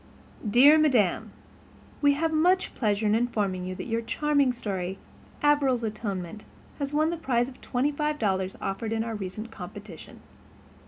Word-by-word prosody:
"DEAR 280 +8 +7
MADAM: 225 - +2 0.7
We 285 -1 +5
have 320 +3 -1
much 360 +4 +2
pleasure 210 -2 0
in 210 - +3
informing 210 -6 0
you 185 0 -4
that - - -6
your 230 -1 -1
charming 285 +2 +1
story 195 -6 -4 0.5
'Averil's 280 -5 +3
Atonement' 210 -3 -4 0.4
has 280 -1 -2
won 310 +2 +2
the 340 - -3
prize 245 -6 0
of 260 -1 -12
twenty 260 +4 0
five 300 +1 -1
dollars 190 -4 -1
offered 215 +3 -3
in 225 0 0
our 230 0 -4
recent 210 +2 -6
competition. 195 -3 -10
230 Hz, 155 wpm, -27 LUFS, 205-285 Hz, 0.7 s, DEAR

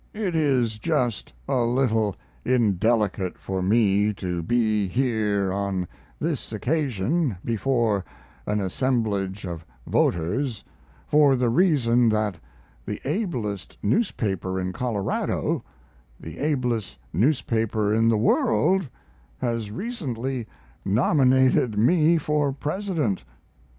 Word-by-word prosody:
It 205 -5 -2
is 130 -8 +1
just 125 - -1 0.2
a 135 -2 +1
little 115 -4 +1 0.3
indelicate 105 -4 +1
for 95 -1 -3
me 105 +1 +3
to 90 -3 -3
be 110 +1 +1
here 105 -4 0
on 100 -2 -2 0.3
this - - -3
occasion 140 - 0
before 115 -3 +1 0.4
an 105 0 0
assemblage 100 -2 -1
of 85 -2 -6 0.2
voters, 105 - 0 0.4
for 145 -2 +4
the 125 -2 +1
reason 125 -7 +3
that 105 -5 0 0.4
the 105 +7 -5
ablest 130 - -3
newspaper 95 - 0
in 95 0 -3
Colorado 105 -3 -1 0.6
the 80 0 -9
ablest 125 - -1 0.2
newspaper 110 - +1
in 115 +1 +3
the 115 - +3
world 120 - +2 0.5
has 115 - -2
recently 130 - -4 0.4
nominated 130 - +3
me 160 +8 +4
for 150 -2 0
President. 150 - -2
115 Hz, 100 wpm, -24 LUFS, 100-135 Hz, 0.6 s, for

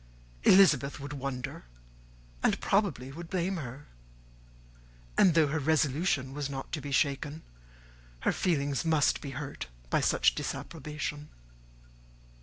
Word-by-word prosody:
Elizabeth 150 -8 +5
would 140 +1 -6
wonder, 130 - -5 0.8
and - - +2
probably 170 - 0
would 165 +3 -8
blame 185 0 -1
her; 140 -1 -7 1.3
and 175 -4 +5
though 160 -2 +6
her 150 +2 -1
resolution 145 -2 +1
was 145 -1 -3
not 135 -1 -6
to 155 - -3
be 145 - -6
shaken, 145 +3 0 0.8
her - - +2
feelings 140 -7 0
must 160 -3 +2
be 145 - -6
hurt 145 - -6 0.2
by - - +3
such - - +4
a - - -16
disapprobation. 150 -1 -5
145 Hz, 125 wpm, -30 LUFS, 140-160 Hz, 1.3 s, though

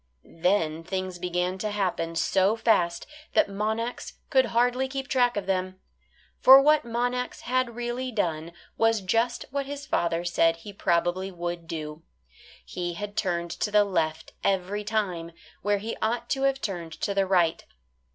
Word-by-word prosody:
Then 165 -2 0
things 185 0 -4
began 180 +1 -1
to 215 - -2
happen 180 -5 -1
so 190 +5 +2
fast 180 -7 +1 0.3
that 320 - +4
Monax 220 +4 -3 0.2
could 260 -3 +5
hardly 245 +3 +2
keep 270 0 -5
track 245 -5 +2
of 200 - -2
them. 185 0 -2 0.6
For 265 +1 +10
what 300 +2 +5
Monax 245 +1 -2
had 255 -1 0
really 240 +2 -3
done 170 -7 -2 0.3
was 225 -1 +3
just 230 +6 0
what 280 0 -2
his 285 0 -6
father 170 - 0
said 165 -1 +3
he 200 +5 -11
probably 175 +1 0
would 175 -2 -5
do. 155 -1 -6 0.6
He 175 -1 -4
had 205 +2 -6
turned 170 -4 -1
to 190 - -2
the 210 0 +5
left 160 -5 -2
every 195 +2 0
time, 185 -6 -2 0.3
where 205 +1 +1
he 220 +3 -4
ought 235 +2 -1
to 270 - 0
have 270 0 -4
turned 175 -5 -4
to 200 - 0
the 195 -1 +1
right. 175 -4 +2
195 Hz, 160 wpm, -26 LUFS, 175-235 Hz, 0.6 s, For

